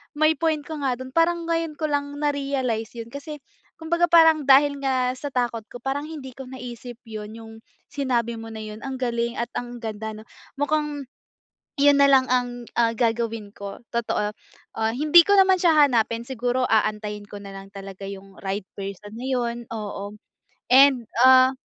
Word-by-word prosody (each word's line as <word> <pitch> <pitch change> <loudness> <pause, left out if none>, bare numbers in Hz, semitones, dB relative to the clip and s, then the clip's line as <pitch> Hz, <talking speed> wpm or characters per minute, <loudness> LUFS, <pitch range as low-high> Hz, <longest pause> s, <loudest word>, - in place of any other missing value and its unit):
May 310 +1 +3
point 315 -2 0
ka - - -9
nga 255 -2 +1
dun. 260 0 -8
Parang 335 +1 +2
ngayon 330 -2 -1
ko 315 - -6
lang 285 0 -1
na-realize 275 -6 -1
yun. 230 -1 -6
Kasi 290 +2 -7 0.4
kumbaga 340 +2 +1
parang 320 -2 +6
dahil 280 +1 +5
nga 255 -2 +1
sa 290 - -4
takot 240 -3 -1
ko. 245 - -10
Parang 275 +2 -2
hindi 290 -5 -8
ko 265 -1 -9
naisip 245 -1 -8
yun 215 0 -7
yung 225 -1 -11 0.4
sinabi 240 -4 -1
mo 225 - -8
na 220 -1 -7
yun, 215 0 -8
ang 265 - -4
galing 235 -1 -1
at 235 - -1
ang 245 0 -6
ganda 220 0 -4
'no. 215 - -11 0.4
Mukhang 295 0 -1 0.8
yun 285 +1 +6
na 280 0 +5
lang 260 -1 +5
ang 245 -1 -1
ah, 235 -1 +3
gagawin 230 -2 -2
ko, 200 -1 -8 0.2
totoo. 210 -3 -1 0.4
Ah, 220 0 0
hindi 300 +8 +6
ko 405 +3 +3
naman 380 -1 +5
siya 310 -4 +6
hanapin 230 -2 0
siguro 250 0 -1
aantayin 210 -2 0
ko 205 0 -10
nalang 195 -1 -10
talaga 195 -1 -10
yung 195 0 -8
right 195 0 -3
person 200 +1 -7
na 235 - -8
yun, 240 -2 -2
oo, 210 -2 -6 0.5
and 265 -1 +6 0.2
ah 260 +1 +7
245 Hz, 175 wpm, -24 LUFS, 220-285 Hz, 0.8 s, ah